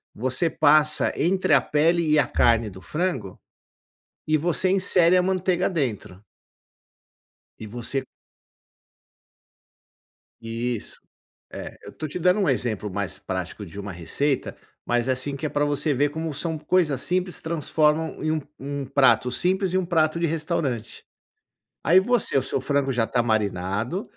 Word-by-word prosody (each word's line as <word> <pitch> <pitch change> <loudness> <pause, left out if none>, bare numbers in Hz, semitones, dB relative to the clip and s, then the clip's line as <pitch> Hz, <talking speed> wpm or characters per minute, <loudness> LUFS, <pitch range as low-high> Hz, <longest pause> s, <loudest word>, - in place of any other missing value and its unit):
você 130 - 0
passa 155 0 +3
entre 185 +4 +1
a - - +7
pele 165 +2 +1
e 150 - +4
a 135 - +3
carne 115 -2 +2
do 95 0 -12
frango 150 - -3 0.9
e 155 0 +3
você 175 +4 0
insere 185 -2 +4
a - - +4
manteiga 185 -1 +1
dentro. 110 - -3 1.3
E 110 - -8
você 120 +4 -3 2.4
Isso. 115 0 -4 0.5
É, - - -8
eu - - -9
estou 155 - -6
te 180 - -4
dando 180 +4 +3
um 185 - +1
exemplo 110 -5 -1
mais 95 -2 -4
prático 95 +1 -5
de 90 +5 -10
uma 100 -1 -6
receita, 135 - -2 0.3
mas 120 +1 0
é - - +3
assim, 140 +2 -2
que 155 - -3
é - - -1
pra 145 0 0
você 145 0 0
ver 145 +3 +1
como 160 0 -4
são 160 +2 -2
coisas 150 -4 +1
simples, 180 0 -1
transformam 160 -1 0
em 155 - 0
um 155 - 0 0.2
um 140 0 -4
prato 125 -3 +3
simples 185 +5 0
em - - +4
um 180 - -1
prato 160 -1 +1
de 170 - +1
restaurante. 150 -8 -3 0.8
Aí 180 +4 +5
você, 235 - +1
o - - +1
seu 130 - -2
frango 140 0 0
já 120 -2 +1
está 120 +1 0
marinado, 110 - -1
145 Hz, 155 wpm, -24 LUFS, 120-170 Hz, 2.4 s, a